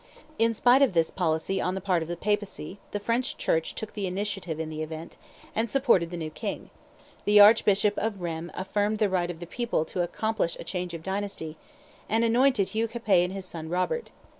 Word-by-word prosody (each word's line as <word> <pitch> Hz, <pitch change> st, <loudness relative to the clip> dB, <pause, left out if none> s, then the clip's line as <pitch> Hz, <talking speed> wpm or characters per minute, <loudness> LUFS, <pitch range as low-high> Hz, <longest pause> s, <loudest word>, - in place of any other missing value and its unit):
In 230 Hz, 0 st, +3 dB
spite 245 Hz, +4 st, +5 dB
of 260 Hz, -10 st, +4 dB
this 165 Hz, -1 st, +3 dB
policy 170 Hz, +1 st, 0 dB
on 180 Hz, +1 st, -1 dB
the -, -, -2 dB
part 185 Hz, -3 st, +1 dB
of 160 Hz, -, -4 dB
the 175 Hz, 0 st, -4 dB
Papacy, 205 Hz, -2 st, -2 dB
the 205 Hz, -, -3 dB
French 235 Hz, +5 st, -1 dB
Church 160 Hz, 0 st, 0 dB
took 220 Hz, -, -6 dB
the 205 Hz, -2 st, -2 dB
initiative 190 Hz, -4 st, -3 dB
in 160 Hz, -1 st, -3 dB
the 155 Hz, 0 st, -4 dB
event, 160 Hz, +1 st, -6 dB, 0.4 s
and 225 Hz, +1 st, 0 dB
supported 235 Hz, -10 st, +3 dB
the 175 Hz, -, -5 dB
new 160 Hz, -2 st, -4 dB
king; 205 Hz, +5 st, -5 dB, 0.5 s
the 210 Hz, 0 st, +5 dB
Archbishop 205 Hz, -1 st, +6 dB
of 210 Hz, -2 st, -2 dB
Rheims 170 Hz, -1 st, -4 dB
affirmed 205 Hz, +3 st, 0 dB
the 210 Hz, -2 st, +2 dB
right 180 Hz, -2 st, 0 dB
of 170 Hz, -2 st, -6 dB
the 175 Hz, -, -6 dB
people 235 Hz, -4 st, -1 dB
to 180 Hz, -, -3 dB
accomplish 210 Hz, 0 st, -1 dB
a -, -, -5 dB
change 180 Hz, -2 st, -4 dB
of 160 Hz, -, -8 dB
dynasty, 190 Hz, -5 st, -4 dB, 0.5 s
and 225 Hz, +2 st, +2 dB
anointed 235 Hz, -3 st, +3 dB
Hugh 225 Hz, +1 st, 0 dB
Capet 215 Hz, -6 st, +2 dB
and 180 Hz, -, -5 dB
his 195 Hz, -1 st, -5 dB
son 160 Hz, -3 st, -7 dB
Robert. 185 Hz, -, -1 dB
195 Hz, 205 wpm, -27 LUFS, 170-220 Hz, 0.5 s, Archbishop